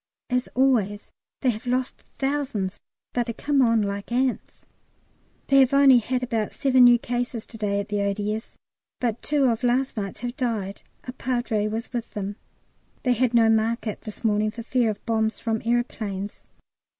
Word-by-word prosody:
As 250 0 +1
always, 230 -6 +1 0.3
they 255 - +3
have 220 +2 -8
lost 255 +1 -1
thousands, 270 -9 -2 0.3
but 240 -1 0
they 230 - -2
come 285 +3 +1
on 230 -3 +4
like 200 +2 -4
ants. 255 +1 -1 0.8
They 275 - +5
have 265 0 +4
only 275 -3 +7
had 250 +2 -2
about 225 -4 -1
seven 260 -2 +5
new 240 0 +7
cases 240 -1 -3
to 225 - -11
day 200 -1 0
at 200 +1 -4
the 205 -1 0
O.D.S., 210 +2 -2 0.4
but 235 -2 -1
two 295 -1 +1
of 235 -1 +1
last 250 +1 +1
night's 200 -1 -4
have 245 0 -4
died. 215 -6 -2 0.2
A 250 - -6
Padre 240 -5 -1
was 225 +3 -4
with 235 -2 -3
them. 205 0 -4 0.7
They 250 - +3
had 245 0 +1
no 230 -1 +6
market 225 0 +1
this 215 +1 -9
morning, 215 -1 +2
for 230 +2 -7
fear 240 -1 +1
of 210 - -5
bombs 220 -1 0
from 225 -2 -1
aeroplanes. 215 -4 -2
230 Hz, 175 wpm, -25 LUFS, 215-250 Hz, 0.8 s, only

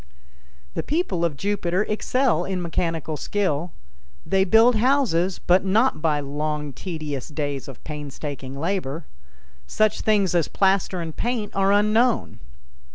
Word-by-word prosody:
The - - -2
people 285 - -1
of 160 -4 0
Jupiter 195 -1 0
excel 215 - +1
in 190 0 -2
mechanical 165 -3 -2
skill. 175 -1 -1 0.5
They 190 0 +2
build 225 +4 +5
houses, 215 -8 +2
but 180 +2 +3
not 210 +1 +2
by 155 -2 +2
long, 150 0 -3
tedious 155 -5 -5
days 145 -3 -3
of 135 -4 -11
painstaking 140 -2 -6
labor. 165 -3 -2 0.6
Such 215 - +1
things 205 -5 +2
as 170 -3 +2
plaster 190 -2 +1
and 160 -2 -6
paint 235 -3 -2
are 195 0 +3
unknown. 215 - +2
180 Hz, 130 wpm, -23 LUFS, 150-205 Hz, 0.6 s, build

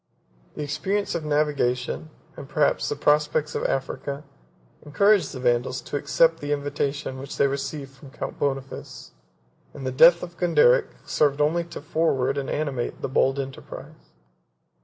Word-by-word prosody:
The 150 - -4
experience 190 +8 -1
of 170 - -2
navigation, 145 -2 0 0.3
and 140 - -10
perhaps 150 -2 +1
the - - -1
prospect 150 +1 +2
of - - -2
Africa, 140 +2 -2 0.6
encouraged 200 +4 +3
the 130 - -7
Vandals 125 +1 +1
to - - -7
accept 165 +3 +3
the 145 -1 -4
invitation 140 -1 -2
which 135 +1 -7
they - - +4
received 140 0 -3
from 135 +1 -14
Count - - -6
Boniface; 135 -1 -4 0.6
and 135 - -7
the 130 - -1
death 165 +6 +6
of 175 -1 -8
Gonderic 465 - +4 0.2
served 145 -1 +1
only 165 +3 +2
to 170 - -9
forward 140 -4 +1
and 135 - -4
animate 140 -5 -3
the - - -1
bold 135 +1 +2
enterprise. 130 - -8
145 Hz, 150 wpm, -25 LUFS, 135-155 Hz, 0.6 s, death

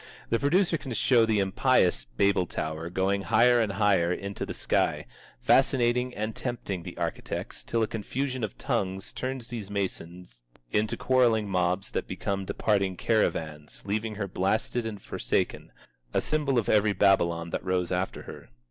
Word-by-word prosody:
The 115 - +2
producer 170 +3 +2
can 135 - -7
show 115 -1 +4
the 110 -1 +2
impious 95 -9 +2
Babel 90 +9 +1
Tower, 80 +1 -4
going 95 +2 0
higher 120 +6 +4
and 105 -3 0
higher 95 -4 +3
into 100 +1 -4
the - - -4
sky, - - 0 0.4
fascinating 125 -2 +3
and 110 +1 -3
tempting 115 -7 -4
the - - -9
architects - - -4
till 115 -1 0
a - - +1
confusion 130 +4 -3
of 105 - -4
tongues 95 0 -2
turns 130 -2 -5
those 110 -5 -5
masons 90 -8 -5 0.3
into 105 +1 0
quarrelling 120 -5 +3
mobs 90 0 0
that - - -2
become 100 -1 -3
departing 100 -2 0
caravans, 80 -9 -1
leaving 105 +2 -2
her 100 -1 -3
blasted 110 +5 -1
and 105 -3 -7
forsaken, - - -2 0.4
a - - +5
symbol 145 -4 0
of 115 - +1
every 105 -1 +3
Babylon 85 -4 +2
that - - -3
rose 90 -1 -1
after 90 +1 -2
her. - - -11
100 Hz, 155 wpm, -27 LUFS, 95-115 Hz, 0.4 s, a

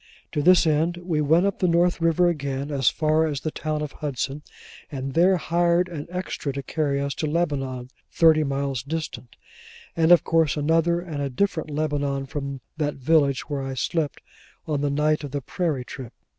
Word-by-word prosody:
To 150 - -1
this 180 +3 +6
end, 160 +2 +1
we 175 -3 -1
went 160 +5 +4
up 200 - -1
the 180 - +2
North 175 0 +2
River 165 +1 +3
again, 140 -3 -2
as 135 -3 +3
far 155 +1 +1
as 145 -3 -3
the 155 - -3
town 155 -1 -3
of 150 - -5
Hudson, 140 0 -4 0.5
and 135 -1 -4
there 180 +4 +4
hired 170 +1 +2
an 155 -4 -6
extra 180 -5 -4
to 140 0 -5
carry 145 -2 -1
us 140 0 -2
to 155 - -3
Lebanon, 135 -6 -2 0.2
thirty 160 -2 +5
miles 140 -2 -2
distant: 150 -4 -6 0.6
and 165 0 +3
of 175 -3 +7
course 160 -3 +2
another 165 +3 +2
and 160 -5 -5
a 140 - -1
different 160 +3 -1
Lebanon 145 -2 -1
from 140 -2 -5 0.2
that 150 -2 -1
village 140 -1 +2
where 145 -2 -3
I 135 0 -4
slept 150 +3 -2 0.4
on 150 -3 -1
the 145 - +1
night 150 +2 +1
of 145 - -5
the 140 +1 -3
Prairie 145 -2 -2
trip. 125 -2 -9
150 Hz, 185 wpm, -24 LUFS, 140-165 Hz, 0.6 s, of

